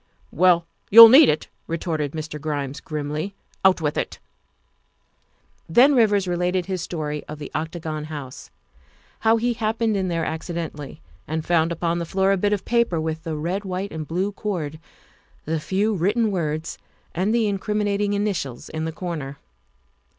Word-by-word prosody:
" - - -35
Well, 175 -2 +5 0.2
you'll 230 +2 +12
need 270 +4 +8
it," 150 - 0 0.2
retorted 160 -3 -2
Mr. 155 -1 -6
Grimes 145 -2 -3
grimly, 155 +5 -4
" - - -35
out 190 -2 +4
with 150 -1 -1
it." - - -4 1.5
Then 250 - +6
Rivers 205 -6 +3
related 180 +1 0
his 185 -1 -3
story 150 -3 -4
of 155 - -7
the 145 -1 -8
Octagon 155 -1 -4
House; 145 -4 -8 0.7
how 225 +1 +3
he 240 +2 0
happened 225 0 0
in 190 -1 0
there 165 -2 -1
accidentally 160 -3 -5 0.3
and 160 +1 -3
found 170 -1 +2
upon 170 0 -1
the 170 - -3
floor 190 +2 +2
a - - +4
bit 205 +2 +1
of 205 -2 -1
paper 235 -8 +1
with 160 0 -3
the 160 -1 -4
red, 175 +7 -2
white, 190 +1 -4
and 155 -2 -6
blue 185 +5 -1
cord, 170 -7 -4 0.7
the 160 +1 -1
few 200 +7 0
written 210 +5 +1
words, 155 -3 -3 0.3
and 185 +5 0
the 230 -1 +2
incriminating 205 0 -1
initials 195 - -3
in 160 0 -4
the 160 - -3
corner. 155 -5 -5
175 Hz, 165 wpm, -23 LUFS, 155-200 Hz, 1.5 s, you'll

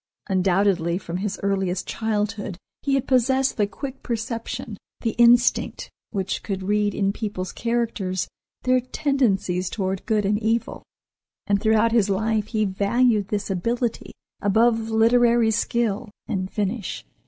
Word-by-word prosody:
Undoubtedly 185 -2 +2
from 175 -2 -5
his 200 +1 -3
earliest 195 -2 0
childhood 210 -3 -2 0.2
he 275 -1 +1
had 270 - 0
possessed 260 +1 +2
the 205 -2 +1
quick 265 +6 -7
perception, 230 0 -4 0.3
the 230 - 0
instinct, 240 0 +4 0.2
which 195 -3 -2
could 195 -2 -4
read 205 +1 +1
in 195 -1 +1
people's 200 -5 -4
characters 230 -5 -1 0.4
their 255 0 +3
tendencies 240 - 0
toward 190 -2 -2
good 215 -2 +1
and 210 +2 +1
evil, 225 +1 -1 0.6
and 200 -1 +1
throughout 220 +1 +3
his 220 -3 +3
life 215 +2 0
he 215 -2 0
valued 205 +2 +2
this 205 -1 -2
ability 230 +6 -2 0.3
above 225 +2 +2
literary 230 +1 +4
skill 230 0 0 0.2
and 185 -2 -2
finish. 205 +1 -3
215 Hz, 130 wpm, -23 LUFS, 195-235 Hz, 0.6 s, instinct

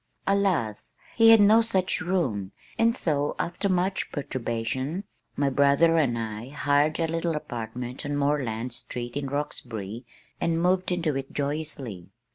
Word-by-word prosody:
Alas! 185 - 0 0.2
he 225 -1 +7
had 225 -1 +9
no 215 +3 +7
such 190 -6 0
room, 130 - -1 0.3
and 230 +2 +3
so 145 -3 0
after 180 +4 -2
much 185 +1 0
perturbation, 130 - -3 0.3
my 140 - +1
brother 140 +4 +4
and 130 -7 +2
I 110 +1 -5
hired 145 +2 +1
a 165 - +2
little 165 0 -1
apartment 120 -2 -5
on 145 -1 -2
Moreland 130 -5 -1
street 120 0 -6
in 140 -1 -2
Roxbury 120 -6 -4 0.4
and 165 -1 +1
moved 180 +1 +2
into 165 -5 0
it 135 0 -4
joyously. 140 - -4
145 Hz, 140 wpm, -26 LUFS, 120-175 Hz, 0.4 s, had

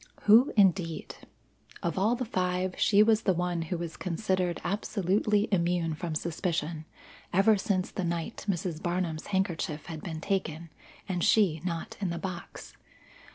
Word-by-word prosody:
Who 225 +6 +6
indeed! 180 -4 +2 0.7
Of 170 - -1
all 210 +5 +2
the 250 +1 -3
five, 185 -3 -1
she 205 0 +5
was 220 0 +3
the 190 - +2
one 175 -1 -1
who 165 +2 -3
was 165 -1 -5
considered 185 -1 -1
absolutely 205 +1 +1
immune 170 -3 +1
from 160 +1 -4
suspicion 165 -1 -2 0.5
ever 195 +4 +5
since 190 -2 -1
the 190 - -3
night 170 +6 -3
Mrs. 170 -3 -2
Barnum's 175 -3 -2
handkerchief 175 -6 -1
had 160 -3 -7
been 160 -3 -5
taken, 165 -3 -2 0.4
and 180 -3 -1
she 180 -8 +3
not 170 -3 -4
in 195 -3 -1
the 170 - -3
box. 175 0 -7
180 Hz, 150 wpm, -29 LUFS, 165-195 Hz, 0.7 s, Who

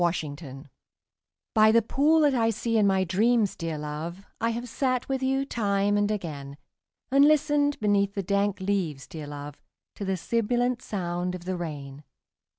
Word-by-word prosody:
THE 175 -1 +4
POOL 145 -4 -6 0.9
By 215 0 +6
the 230 0 +4
pool 300 +7 +3
that 290 -2 +4
I 230 -3 +2
see 230 +1 -1
in 210 -2 +4
my 190 -1 +3
dreams, 210 +4 +2
dear 165 -2 -4
love, 155 +6 -6 0.2
I 230 - +2
have 235 +2 -3
sat 255 0 -1
with 270 -1 -1
you 270 +1 +1
time 205 -4 +1
and 205 0 +2
again; 145 -9 -5 0.5
And 275 +1 +6
listened 290 -1 +3
beneath 200 -1 +1
the 200 - -2
dank 200 +1 0
leaves, 185 -9 -1
dear 155 -3 -8
love, 145 0 -8 0.4
To - - -5
the 190 -1 -1
sibilant 240 +5 0
sound 180 -3 -3
of 175 -1 -9
the 185 0 -2
rain. 145 -4 -6
200 Hz, 170 wpm, -27 LUFS, 170-235 Hz, 0.9 s, By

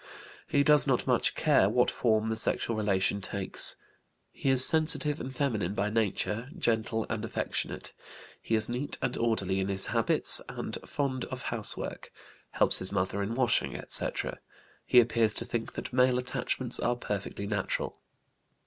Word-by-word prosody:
He 140 - +1
does 150 0 +6
not 130 -3 0
much - - 0
care - - +2
what - - +1
form 110 -1 -1
the 110 - -2
sexual 115 +1 -1
relation 100 -1 -1
takes. - - -3 0.6
He 135 - -4
is 130 -1 +12
sensitive 155 -2 +1
and 130 - -7
feminine 110 -9 -3
by 105 +1 -2
nature, 110 +2 -2
gentle, 115 -6 -2
and 115 -1 -5
affectionate. 115 - -5 0.5
He 115 - -2
is 110 -1 +3
neat 125 +4 -1
and 125 - -2
orderly 100 -5 -2
in 95 - -2
his 95 -1 0
habits, - - +6
and - - -6
fond 130 -3 -3
of - - -8
housework; - - -3 0.4
helps - - +3
his 95 - -2
mother 100 0 -2
in 105 +4 -4
washing, 125 -3 0
etc. - - 0 0.5
He 125 - +5
appears 115 -2 +1
to - - -5
think 115 -1 -5
that - - -8
male 125 0 +2
attachments 125 0 -4
are 120 - -1
perfectly 100 -3 -6
natural. 100 -2 -4
115 Hz, 155 wpm, -28 LUFS, 105-130 Hz, 0.6 s, is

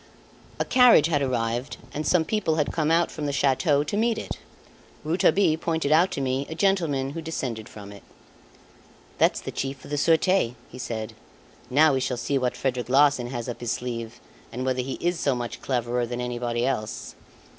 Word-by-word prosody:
A - - +1
carriage 250 - +6
had 155 -3 +1
arrived 120 -1 -1 0.2
and 150 0 -3
some 170 -3 +3
people 210 -6 0
had 150 -2 0
come 155 -2 0 0.2
from 150 - -5
the - - 0
chateau 140 +2 +2
to 150 - -4
meet 225 +1 +1
it. - - -6 0.6
Rouletabille 165 +1 +2
pointed 160 -3 -1
out 170 +4 +5
to - - -3
me 135 +1 -1
a 160 - -5
gentleman 165 -8 +1
who 165 - -5
descended 125 -9 -4
from 100 -1 -10
it. 100 - -12 1.2
"That's - - +3
the - - -6
Chief 135 0 -5
of - - -11
the 145 - -1
Surete" 165 -5 +2 0.2
he 125 - -10
said. 110 -3 -4 0.6
"Now 150 +3 +5
we 135 - +1
shall 125 -1 -2
see 135 +3 0
what 125 -1 -1
Frederic 125 -3 -2
Larsan 140 -2 +4
has 120 -2 -5
up 120 - -5
his 120 -2 -2
sleeve, 120 -1 -5 0.3
and 125 +2 -4
whether 130 -1 0
he 130 +1 -4
is 175 0 -1
so 140 -3 +1
much 120 -1 -5
cleverer 120 -1 -1
than 120 +1 -4
anybody 120 -1 -2
else." 110 -5 -3
135 Hz, 190 wpm, -25 LUFS, 120-160 Hz, 1.2 s, carriage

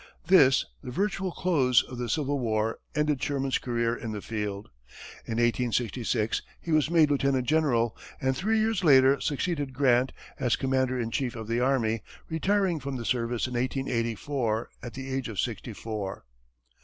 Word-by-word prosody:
This, 145 -8 +6 0.2
the 130 - -6
virtual 190 +5 -1
close 135 -10 +3
of 125 -1 -9
the 120 -1 -3
Civil 145 -2 0
War, 110 -2 0 0.2
ended 150 -3 +1
Sherman's 135 -2 0
career 120 -1 0
in 115 -2 -5
the 105 - -4
field. 105 - -4 0.6
In - - -3
1866, 120 -1 0 0.2
he 170 - -6
was 155 -1 +3
made 160 -3 +4
lieutenant 135 -2 +1
general, 125 -7 +2 0.2
and 130 0 0
three 220 +10 +1
years 220 -3 +1
later 135 -3 +6
succeeded 145 -2 -2
Grant 130 -1 +3 0.3
as 125 -4 +2
commander 130 -1 0
in 115 -1 -2
chief 125 -2 -1
of 110 -2 -6
the 115 +1 0
army, 120 -4 +1 0.3
retiring 185 +1 +1
from 140 -1 -5
the 120 -2 -5
service 120 -1 0
in 125 - -5
1884, 120 -1 -1
at 120 0 -8
the 135 0 -6
age 130 -2 -2
of 105 -5 -5
sixty 115 +2 -2
four. 105 - -5
130 Hz, 165 wpm, -28 LUFS, 115-145 Hz, 0.6 s, This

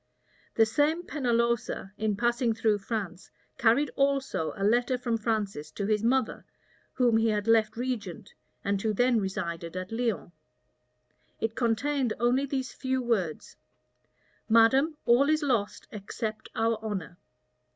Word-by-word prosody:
The 225 - +5
same 295 +9 +1
Pennalosa, 235 - -1
in 215 -1 -1
passing 240 +1 +1
through 220 -2 +1
France, 195 -4 -5 0.3
carried 240 +5 +3
also 275 - 0
a 195 - -3
letter 240 +4 +2
from 240 -2 -1
Francis 210 -9 -2
to 200 - -3
his 210 0 +1
mother, 255 +3 0 0.5
whom 240 -3 +3
he 225 0 +2
had 210 0 -1
left 220 -1 +3
regent, 235 -8 -4 0.3
and 200 -1 0
who 220 0 0
then 245 +2 +3
resided 170 -3 -4
at 185 +2 -5
Lyons. 225 -6 -2 1.1
It 225 0 -1
contained 250 +2 0
only 250 +4 +2
these 265 -2 -3
few 260 0 -1
words: 210 -11 -2 0.9
"Madam, 265 +8 +4
all 250 +4 +4
is 310 0 +2
lost, 235 -8 -1
except 215 +1 -5
our 225 0 +1
honor." 190 -5 -5
225 Hz, 135 wpm, -28 LUFS, 210-250 Hz, 1.1 s, The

